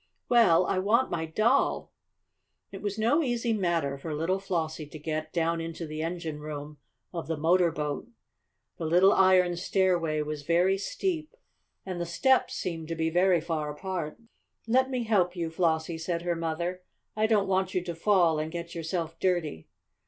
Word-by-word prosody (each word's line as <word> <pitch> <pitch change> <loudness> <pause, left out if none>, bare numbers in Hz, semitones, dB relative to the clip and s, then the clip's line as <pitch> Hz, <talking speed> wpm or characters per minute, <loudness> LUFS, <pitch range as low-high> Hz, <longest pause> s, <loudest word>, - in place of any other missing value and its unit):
"Well, 185 -8 +5
I 185 - 0
want 230 +7 +2
my 160 -1 -2
doll!" 220 - +1 0.8
It 195 - -8
was 205 0 -3
no 235 +9 +3
easy 240 -4 0
matter 170 -9 0
for 155 +1 -4
little 170 +5 0
Flossie 160 -5 -3
to 155 - -9
get 155 0 -4
down 165 -1 0
into 165 +1 -5
the 155 0 -5
engine 165 -2 -4
room 150 0 -7 0.3
of 170 -2 -5
the 160 -1 -2
motor 170 +2 +3
boat. 150 +5 -3 0.7
The 165 - -2
little 180 +5 +5
iron 185 -2 +4
stairway 175 -4 +1
was 150 -1 -5
very 175 +5 +2
steep, 320 - -3 0.5
and 185 -2 -4
the 170 - -3
steps 260 +10 +2
seemed 165 -4 -4
to 165 - -3
be 160 0 0
very 180 0 +3
far 155 -2 -2
apart. 170 -1 -4 0.5
"Let 260 +3 +3
me 255 -2 -1
help 190 -5 +2
you, 165 -2 -3
Flossie," 160 -1 0
said 170 +1 -2
her 175 -1 0
mother. 170 +2 -3 0.3
"I 215 0 +2
don't 210 -3 +2
want 190 0 0
you 180 - +1
to 175 -1 -4
fall 170 -3 +3
and 155 +1 -3
get 170 0 -6
yourself 165 0 -4
dirty." 175 - -1
170 Hz, 175 wpm, -28 LUFS, 160-190 Hz, 0.8 s, Well